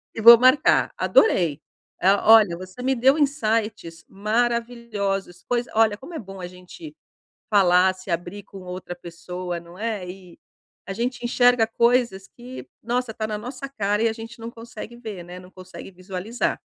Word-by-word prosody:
e - - -5
vou 235 +1 +10
marcar, 255 +4 +4
adorei, 165 - +2 0.4
ah, 195 +2 +3
olha 205 -6 +5
você 185 +6 -10
me 265 +1 +1
deu 265 +4 +4
insights 220 - -1
maravilhosos, 215 -4 -2
coisa 245 0 -1
olha 220 -1 +4
como 300 +9 -11
é - - -4
bom 195 -3 -10
a 180 - -5
gente 185 - -12 0.6
falar, 185 -2 +4
se 185 +1 -14
abrir 175 +4 -4
com 195 - -12
outra 180 -1 -7
pessoa, 175 +1 -7
não 170 +1 -14
é? 215 -4 -3
E 180 -1 -12 0.5
a - - -3
gente 240 +4 -3
enxerga 245 -1 +3
coisas 235 -4 +1
que, 250 +2 -11
nossa, 245 +1 -2
está 215 0 -4
na 215 -1 -3
nossa 250 +6 -7
cara 210 -5 -1
e - - +4
a - - -2
gente 225 +1 -10
não 230 0 -7
consegue 230 0 -10
ver 215 -7 -8
né, 180 +1 -10
não 180 0 -15
consegue 185 0 -11
visualizar. 190 +5 -4
215 Hz, 170 wpm, -23 LUFS, 185-240 Hz, 0.6 s, vou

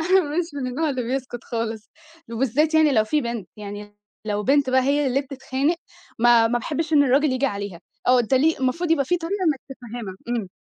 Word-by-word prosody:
أنا 380 0 +7
مش 325 +1 -1
من 275 -3 -3
النوع 300 +5 -1
اللي 260 -2 -2
بيسكت 250 0 -4
خالص، 225 -2 -4 0.4
وبالذات 270 +7 +1
يعني 315 -2 +5
لو 220 -4 +3
في 300 +8 +1
بنت، 235 -7 -4
يعني 205 0 -8 0.3
لو 210 -1 -1
بنت 275 +3 +3
بقى 260 0 +4
هي 285 +2 +2
اللي 265 +1 +1
بتتخانق 275 +3 -2 0.4
ما 235 -1 +5
ما 240 +1 +1
باحبش 315 +5 -3
إن 290 -2 +6
الراجل 275 +2 +3
ييجي 260 +2 +1
عليها. 200 -5 -5 0.3
آه 250 0 +5
أنت 240 +3 0
لي 310 +5 +3
المفروض 315 +7 0
يبقى 305 -4 +3
في 355 +6 +1
طريقة 370 +4 -3
إنّك 300 -6 +1 0.2
تفَهّمها، 235 -5 -7
إمم 235 -5 -2
260 Hz, 205 wpm, -23 LUFS, 230-295 Hz, 0.4 s, أنا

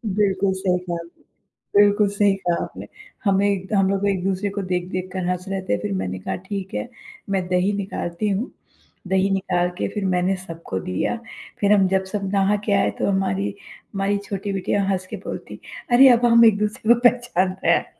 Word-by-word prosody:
बिल्कुल 195 -2 +2
सही 190 -1 0
कहा 180 -1 -4
आपने 170 0 -10 0.6
बिल्कुल 205 0 +4
सही 205 0 +2
कहा 175 -3 -1
आपने। - - -9 0.4
हमें 195 -1 +2
द - - -6
हम 195 -1 +3
लोग 200 +1 0
एक-दूसरे 195 +1 -1
को - - 0
देख-देख 185 +1 -2
कर 185 -1 -2
हँस 180 +1 -2
रहे 195 0 -2
थे, 105 - -1
फिर 105 -1 -3
मैंने 95 -1 -3
कहा 95 - -3
ठीक 195 -1 -5
है, 105 +1 -3 0.4
"मैं 190 -2 0
दही 185 +3 +1
निकालती 195 0 -3
हूँ," 205 +6 -2 0.6
दही 190 +1 +2
निकाल 180 -2 0
के - - -1
फिर 205 -2 -2
मैंने 185 +1 +1
सबको 165 - -6
दिया। 90 - -1 0.4
फिर 205 0 +4
हम 195 -2 +4
जब 190 0 +1
सब 200 -2 -2
नहा 200 +1 +3
के 210 - 0
आए 195 - +2
तो - - +1
हमारी, 195 +1 -1 0.4
हमारी 200 +1 0
छोटी 200 0 -3
बिटिया 195 +1 0
हँस 185 -1 -1
के - - -6
बोलती, - - -7 0.3
"अरे! 260 +2 +8
अब 240 0 +4
हम 235 -1 +7
एक-दूसरे 210 +1 +3
को 240 - -2
पहचान 215 -7 0
रहे - - +5
हैं।" - - -1
195 Hz, 195 wpm, -22 LUFS, 180-205 Hz, 0.6 s, अरे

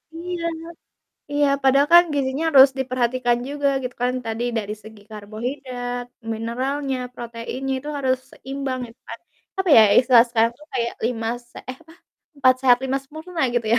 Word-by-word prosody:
Iya 345 0 -5 0.9
iya, 290 0 +2 0.2
padahal 275 +2 +4
kan, 345 0 +9
gizinya 275 +2 -1
harus 275 -3 +8
diperhatikan 250 -1 0
juga, 285 0 0
gitu 250 -1 -5
kan, 250 - +2
tadi 225 +1 -3 0.2
dari 210 0 -4
segi 220 0 -13
karbohidrat, 245 +3 -5 0.3
mineralnya, 260 +5 -2 0.2
proteinnya 240 +3 -5
itu 295 +3 -9
harus 260 -1 +1
seimbang 270 -1 -5
gitu 230 +1 -18
kan, - - -7 0.4
apa 380 -1 0
ya, - - +9 0.2
istilah 245 -2 +6
sekarang 230 0 +2
tuh 300 - -16
kayak, 235 -2 -1
lima 225 -2 -2 0.2
se - - -20
eh, 255 - -10
apa, - - -27 0.5
4 255 -2 +5
sehat, 245 -2 +5
5 265 +1 0
sempurna, 315 +4 -7
gitu 235 -2 0
ya. - - +4
255 Hz, 160 wpm, -22 LUFS, 235-280 Hz, 0.9 s, kan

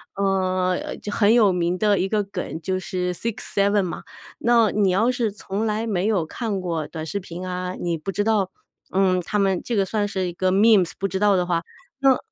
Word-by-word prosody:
呃， 185 -2 0
就 210 - -6
很 205 0 +3
有 215 -5 +5
名 175 +1 0
的 205 -1 +2
一 190 - +1
个 210 -2 +1
梗， 185 -4 -5
就 185 +3 -2
是 180 -1 -2
sixseven 200 -1 0
嘛。 180 - -4 0.4
那 235 -2 +4
你 205 -2 +2
要 220 +7 +3
是 235 -4 -1
从 210 +1 -3
来 215 +2 -1
没 200 -3 0
有 195 -7 +1
看 205 +3 -3
过 165 -4 -3
短 160 -1 -6
视 200 +6 -3
频 180 -1 -7
啊， 180 0 -3
你 170 -1 -1
不 165 +5 -5
知 205 +2 0
道， 210 -4 +1 0.5
嗯， 185 -2 +3
他 210 +4 -2
们 195 -3 +1
这 240 - -2
个 195 -2 +2
算 205 +1 -1
是 190 -2 -2
一 175 - -5
个 185 +1 0
memes， 200 -2 +4
不 195 - -1
知 190 -1 -3
道 205 -1 +4
的 180 -1 +1
话， 170 -2 0 0.4
那 270 -1 +4
195 Hz, 285 characters per minute, -23 LUFS, 180-210 Hz, 0.5 s, 有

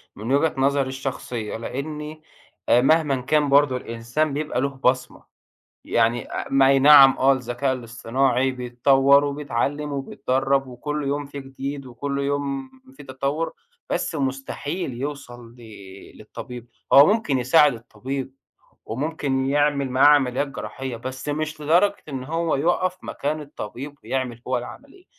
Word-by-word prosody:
من 110 +5 -5
وجهة 150 +3 +2
نظري 135 0 +2
الشخصية، 130 -5 -5
لإني 150 +5 -6 0.5
مهما 135 +1 +3
كان 145 +2 +1
برضه 140 -2 +4
الإنسان 120 +6 -2
بيبقى 145 -3 -2
له 140 - +1
بصمة، 130 -1 -1 0.6
يعني، 115 +1 0
آآ، - - -3
ما 135 -1 +5
أي 135 0 +5
نعم 140 -1 +8
آه 135 +1 +5
الذكاء 130 +1 -1
الاصطناعي 125 +2 0
بيتطور، 135 +3 +3
وبيتعلم 145 +1 -2
وبيتدرب 135 0 -1
وكل 150 +4 -4
يوم 145 +1 -2
في 140 0 -8
جديد، 135 +1 -6
وكل 140 +3 -4
يوم 140 -1 -2 0.2
في 135 - -13
تطور، 140 +5 -3 0.4
بس - - -1
مستحيل 135 +2 -3
يوصل 120 -3 -7
ل - - -17 0.6
للطبيب، 120 +2 -9 0.2
هو 140 +1 +9
ممكن 205 - +1
يساعد 140 +2 +4
الطبيب 130 +3 -6 0.5
وممكن 135 +1 -2
يعمل 145 -1 +1
معاه 130 +3 +4
عمليات 140 -1 +3
جراحية، 135 -2 -6
بس 130 +4 -7
مش 155 +1 -3
لدرجة 175 +7 +3
إن 130 -3 -5
هو 165 +2 -1
يقف 175 +5 0
مكان 150 +2 -3
الطبيب 140 -1 -8
ويعمل 125 -3 -3
هو 130 - +1
العملية، 280 - -11
135 Hz, 135 wpm, -23 LUFS, 130-145 Hz, 0.6 s, هو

